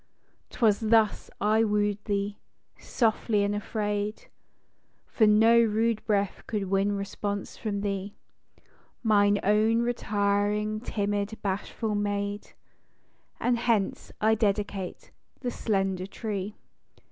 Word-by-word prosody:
'Twas 215 -4 +2
thus 220 -1 +2
I 215 +2 +3
woo'd 205 -1 0
thee 200 -1 -2 0.4
â - - -23
softly 220 -3 +1
and 200 0 0
afraid: 210 0 -3 0.8
For 220 - +2
no 225 +2 +6
rude 225 0 +1
breath 200 -2 0
could 200 -4 -3
win 195 +1 +2
response 200 0 -4
from 205 -3 -3
thee, 200 0 -3 0.9
Mine 205 -2 +4
own 220 +3 +3
retiring, 210 -2 0
timid, 205 -1 -2
bashful 205 +2 -2
maid; 205 0 -2 0.9
And 245 -1 +1
hence 225 -5 0
I 220 +1 +4
dedicate 205 -3 -2 0.3
the 245 -2 -2
slender 195 -5 -1
tree 200 -1 -4
TO 210 - -17
MARY. - - -41
205 Hz, 115 wpm, -27 LUFS, 200-220 Hz, 0.9 s, no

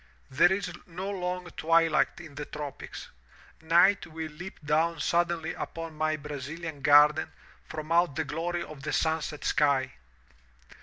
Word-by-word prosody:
There 175 +7 +5
is 190 -2 -1
no 185 +3 -5
long 180 -1 -3
twilight 165 0 +2
in 165 -4 -11
the 145 +1 -6
tropics. 145 -2 -7 0.5
Night 170 +5 +4
will 160 -1 -6
leap 175 +5 -9
down 160 +2 +1
suddenly 170 0 0
upon 165 -1 -6
my 155 0 0
Brazilian 150 +2 -6
garden 150 +2 +5 0.4
from 155 0 -6
out 170 -4 +3
the 160 - -1
glory 170 +3 -2
of 155 -4 -10
the - - -3
sunset 160 -2 -1
sky. 140 -3 +2
160 Hz, 140 wpm, -28 LUFS, 150-170 Hz, 0.5 s, There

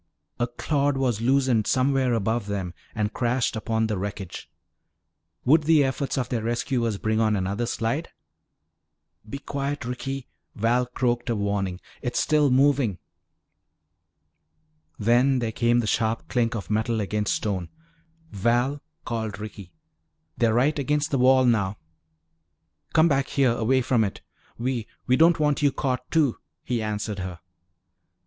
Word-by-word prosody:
A 120 - +1
clod 140 +3 0
was 125 -5 0
loosened 130 -3 +2
somewhere 130 -1 +2
above 110 0 -1
them 95 -4 -3 0.2
and 105 -1 -1
crashed 120 0 0
upon 110 0 0
the 105 -3 -2
wreckage. 100 -2 -6 1.0
Would 150 +3 +5
the 155 -2 +5
efforts 135 +1 -2
of 125 -3 0
their 120 -3 -1
rescuers 115 -1 -1
bring 110 +2 0
on 110 -1 +3
another 100 +5 -1
slide? 135 +11 -2 1.2
"Be 140 - -4
quiet, 140 -1 -4
Ricky," 130 +2 -4 0.3
Val 120 +3 +1
croaked 120 0 -1
a 115 - +1
warning, 100 -3 -1 0.2
"it's 120 -2 -1
still 150 -2 +3
moving." 130 -6 +3 2.0
Then 120 +5 +3
there 115 -3 -1
came 120 +1 +2
the - - -3
sharp 110 +1 0
clink 115 -2 +1
of 105 -2 -5
metal 110 +1 0
against 105 0 0
stone. 95 -5 -2 0.6
"Val," 120 +7 +1 0.2
called 110 -3 -3
Ricky, 100 -3 -8 0.6
"they're 115 -2 +2
right 145 +5 +2
against 145 +2 0
the 135 - +1
wall 130 +1 +5
now!" 105 -4 +1 1.2
"Come 160 0 +5
back 140 -3 +1
here, 135 -3 +2
away 120 +3 +1
from 120 -3 +2
it. 100 - -4 0.4
We 120 -2 -2 0.2
we 125 - +3
don't 165 +3 +5
want 150 -1 +1
you 145 -1 +4
caught, 125 -1 -2
too," 150 -7 +2 0.2
he 120 -2 -1
answered 105 -1 -3
her. 90 -2 -5
120 Hz, 140 wpm, -25 LUFS, 110-135 Hz, 2.0 s, Would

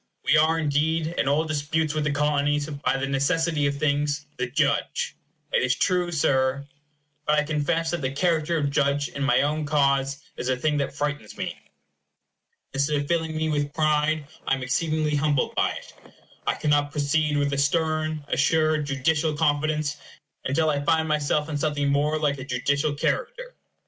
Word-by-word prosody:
We - - +4
are, 160 +2 +4
indeed, 160 +2 0
in - - +1
all 150 +3 +2
disputes 155 0 -1
with 155 -1 -1
the 150 - +1
Colonies, 145 0 +1
by 145 -2 -1
the 135 - -1
necessity 150 +2 +1
of 140 0 -2
things, 145 0 0
the 125 - -1
judge. - - 0 0.4
It - - +3
is 130 0 +2
true, 180 +2 +1
Sir. 140 -3 +1 0.6
But 150 0 +3
I 150 - +3
confess 160 +2 0
that 175 -2 -2
the 130 - 0
character 165 +2 +1
of 145 -2 0
judge 140 0 +1
in 140 - -7
my 130 -2 +3
own 150 +2 0
cause 140 -1 +1
is 125 - -3
a 130 - +1
thing 150 +3 0
that 140 -1 -2
frightens 145 -7 -3
me. - - -3 1.2
Instead 140 +2 +1
of 145 0 -1
filling 160 -1 -1
me 160 0 0
with 145 -1 -1
pride, 155 -1 +1 0.2
I - - +3
am 135 - -6
exceedingly 155 +3 0
humbled 145 -2 +1
by - - +2
it. - - -10 0.5
I - - +2
cannot 145 -1 +1
proceed 150 +1 +1
with 145 0 0
a - - -1
stern, 155 0 0
assured, 155 +1 +2
judicial 150 +3 0
confidence, 150 0 0 0.5
until 155 +4 +2
I 145 -1 -1
find 160 +2 +2
myself 150 -1 0
in 150 -2 -3
something 145 -2 0
more 145 +2 +1
like 145 -2 0
a - - -5
judicial 140 +3 0
character. - - -2
150 Hz, 175 wpm, -25 LUFS, 140-155 Hz, 1.2 s, We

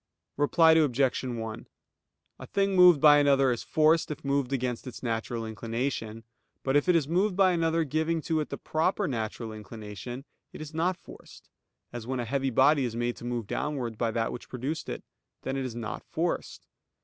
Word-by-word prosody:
Reply 160 +3 +4
Obj. 140 -5 +2
1: 115 -3 -5 0.7
A - - -9
thing 195 -1 0
moved 180 -4 +7
by 145 0 +7
another 135 -2 +4
is 120 - -2
forced 160 +1 +2
if 150 -2 -6
moved 140 -2 0
against 125 -1 -2
its 125 - -9
natural 115 0 -2
inclination; 115 0 -4 0.4
but 135 +1 0
if 145 +5 +3
it 180 - +5
is 155 -4 +2
moved 185 +4 +1
by 190 -1 +5
another 165 -1 +1
giving 160 +2 0
to 160 -2 0
it 150 - -3
the - - -5
proper 180 +5 0
natural 115 -3 -4
inclination, 110 +4 -8 0.3
it - - -9
is 155 0 -8
not 170 +3 0
forced; - - -15 0.4
as 120 -1 -6
when 130 0 -2
a 120 - -2
heavy 135 +3 -1
body 135 +3 +4
is 120 -2 -3
made 120 0 -1
to - - -9
move 120 -2 -3
downwards 130 -1 -3
by 115 +1 0
that 115 0 -1
which 120 - -8
produced 135 +6 -4
it, - - -5 0.4
then 135 - -3
it 135 -1 -2
is 120 -3 -5
not 115 -3 -5
forced. - - -3
135 Hz, 190 wpm, -28 LUFS, 115-155 Hz, 0.7 s, moved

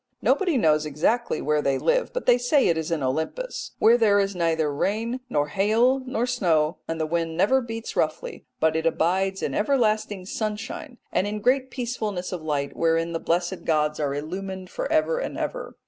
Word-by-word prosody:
Nobody 360 -8 +2
knows 155 -8 +3
exactly 160 - 0
where 150 0 +1
they 140 -2 +1
live, - - +1
but - - -4
they 245 0 +5
say 260 +3 +3
it 170 - +3
is 160 0 -3
in 165 -4 -1
Olympus, 160 - -3
where 235 +2 +5
there 205 -3 +4
is 195 -1 0
neither 160 -3 +1
rain 225 - -1
nor 145 0 0
hail 220 - +3
nor 245 -2 0
snow, 170 -10 +1
and 165 0 -3
the 160 - 0
wind 165 0 -2
never 260 +9 +3
beats 225 -1 -6
roughly; 155 0 -2
but 160 0 +2
it 160 +1 +1
abides 190 +4 0
in - - -1
everlasting 215 -5 +1
sunshine, 215 +6 -4
and 190 - +1
in 210 +1 -3
great 255 +4 +2
peacefulness 220 -8 -3
of 180 -3 -4
light 145 -3 -2
wherein 165 0 +1
the 165 - -1
blessed 175 +3 -1
gods 150 -1 +1
are 140 -2 -1
illumined 185 +5 -5
for - - -4
ever 320 +10 +2
and - - -4
ever. - - -4
190 Hz, 190 wpm, -25 LUFS, 160-235 Hz, -, they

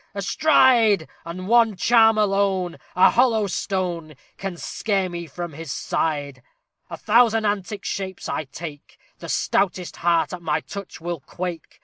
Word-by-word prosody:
astride! 225 - +4 0.2
And 185 +2 -6
one 230 -2 +4
charm 225 +2 +4
alone 195 -4 +1 0.2
A 180 - +6
hollow 230 -4 +3
stone! 175 -5 -3 0.2
Can 195 -3 -5
scare 195 0 -1
me 170 -1 -6
from 170 +2 -6
his 160 -1 -7
side!_ 145 -5 -2 0.5
A - - -6
thousand 225 0 +3
antic 205 0 -2
shapes 190 -1 -4
I 155 - -3
take; 145 +1 -10 0.2
The - - -8
stoutest 185 -2 0
heart 170 +1 +1
at 180 - -6
my 155 -1 -1
touch 200 -2 -9
will 170 -1 -4
quake. 175 +4 -7
185 Hz, 140 wpm, -23 LUFS, 170-210 Hz, 0.5 s, A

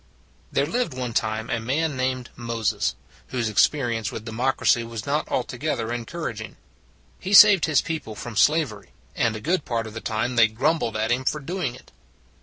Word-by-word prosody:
There 140 - +2
lived 170 - -1
one 125 -2 -4
time 110 0 -1
a 115 - 0
man 140 +6 -1
named 130 -1 -2
Moses 115 -3 -1 0.3
whose 120 -3 -2
experience 115 -1 +1
with 110 - -7
democracy 120 +1 +1
was 115 -2 -6
not 145 +2 -1
altogether 125 -2 -2
encouraging. 120 -3 -5 0.6
He 195 - -4
saved 200 -3 +9
his 155 -3 +3
people 160 -10 -5
from 115 +1 -7
slavery; 140 -6 +1 0.2
and 115 -2 +1
a - - -5
good 170 - 0
part 115 -2 -2
of 110 - -8
the 110 - -6
time 115 +3 -2
they 115 -1 +7
grumbled 115 0 0
at 110 +2 0
him 125 +2 +1
for 150 - 0
doing 150 -4 -3
it. - - -17
120 Hz, 175 wpm, -24 LUFS, 115-150 Hz, 0.6 s, saved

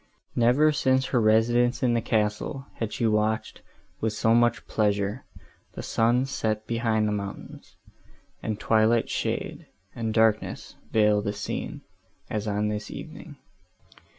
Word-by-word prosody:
Never, 125 +6 +4
since 130 -2 +2
her 120 - +4
residence 120 +3 +3
in 120 -2 +3
the 115 - +1
castle, 110 +4 -1
had 115 -2 -2
she 120 - -1
watched, 110 0 0 0.4
with 110 -1 -1
so 110 +1 +2
much 120 0 +2
pleasure, 105 +1 0 0.5
the - - -7
sun 120 +3 +2
set 110 -5 -2
behind 115 -2 0
the - - 0
mountains, 100 -1 -7 0.7
and 110 -2 -3
twilight 110 +1 +2
shade, - - -3 0.3
and 115 -2 -3
darkness 110 -1 +1 0.2
veil 105 -1 +3
the 100 -1 -2
scene, - - -5 0.5
as 105 0 -2
on 105 0 0
this 105 0 -4
evening. 155 -1 -9
110 Hz, 135 wpm, -26 LUFS, 105-120 Hz, 0.7 s, Never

